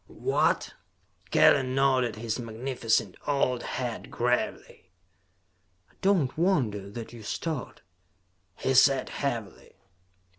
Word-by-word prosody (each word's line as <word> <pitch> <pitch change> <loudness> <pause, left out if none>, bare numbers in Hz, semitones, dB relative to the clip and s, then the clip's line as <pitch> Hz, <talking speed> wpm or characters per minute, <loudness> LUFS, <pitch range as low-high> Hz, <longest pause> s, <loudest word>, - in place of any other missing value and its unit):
"What?" - - 0 0.6
Kellen 130 -2 +4
nodded 130 -4 +2
his 110 +2 -3
magnificent 115 -3 -1
old 130 -4 +1
head 120 -2 -4
gravely. 120 -5 -2 1.0
"I - - -30
do 200 +1 +4
not 140 -8 -1
wonder 120 - +1
that 115 +3 -8
you 115 - -10
start," 140 +2 -5 0.7
he 135 - -1
said 130 0 +4
heavily. 115 -8 -4
125 Hz, 105 wpm, -28 LUFS, 115-135 Hz, 1.0 s, Kellen